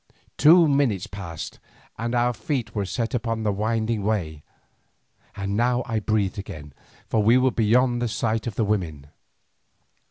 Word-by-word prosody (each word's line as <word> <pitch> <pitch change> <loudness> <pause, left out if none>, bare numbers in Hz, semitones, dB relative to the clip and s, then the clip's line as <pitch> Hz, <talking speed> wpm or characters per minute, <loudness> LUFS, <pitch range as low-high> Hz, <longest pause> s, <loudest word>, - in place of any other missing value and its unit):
Two 165 +3 +6
minutes 140 -10 +1
passed, 85 -5 -7 0.4
and 115 +1 -3
our 120 0 +2
feet 120 -4 -3
were 100 -2 -2
set 115 +4 -2
upon 115 -2 -2
the 105 - +1
winding 110 +2 -1
way, 90 -8 -2 0.9
and 100 0 -3
now 125 +2 +1
I 115 -3 -1
breathed 105 -1 -1
again, 75 -7 -8 0.3
for 110 - +1
we 115 +4 +5
were 130 0 +3
beyond 120 +2 +2
the 120 - 0
sight 115 0 -1
of 110 - -4
the 110 - +1
women. 80 -9 -3
110 Hz, 155 wpm, -24 LUFS, 100-120 Hz, 0.9 s, Two